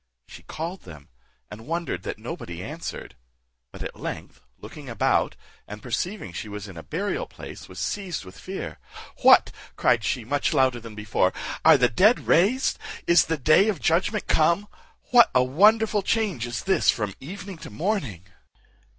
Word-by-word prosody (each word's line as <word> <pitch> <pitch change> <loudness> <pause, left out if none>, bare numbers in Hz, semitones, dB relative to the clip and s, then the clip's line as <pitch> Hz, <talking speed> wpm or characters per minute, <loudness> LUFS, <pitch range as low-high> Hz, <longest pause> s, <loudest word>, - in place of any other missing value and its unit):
She - - -13
called 170 +4 -6
them, 75 -5 -13 0.4
and 110 +4 -10
wondered 165 - -3
that - - -5
nobody 85 +1 -7
answered; 155 - -7 0.6
but - - -8
at - - -7
length - - -7 0.2
looking 145 -3 -11
about, 115 -3 +1 0.3
and 105 +1 -9
perceiving 130 - -3
she 105 - -6
was 105 0 -7
in 95 - -11
a 80 - -7
burial 195 - -3
place, - - -11
was - - -12
seized 185 - -3
with 95 +1 -13
fear. 190 +1 -6 0.4
"What," - - +6 0.2
cried 120 -2 +2
she, 115 +3 -2
much 145 +4 0
louder 130 -2 +3
than 115 -2 -11
before, 105 -3 0 0.3
"are - - +8
the 125 - +4
dead 205 - +3
raised? 220 +10 +2 0.3
Is 170 -1 +5
the 165 - -1
day 155 - +4
of 195 -7 -2
judgment 185 +8 +1
come? 170 +6 +2 0.4
What 245 -1 +7
a 130 - +5
wonderful 210 - +4
change 195 - -1
is 120 0 -4
this 190 0 +2
from 105 -4 +1
evening 190 +4 -8
to - - -9
morning?" 135 - -3
155 Hz, 165 wpm, -25 LUFS, -, 0.6 s, are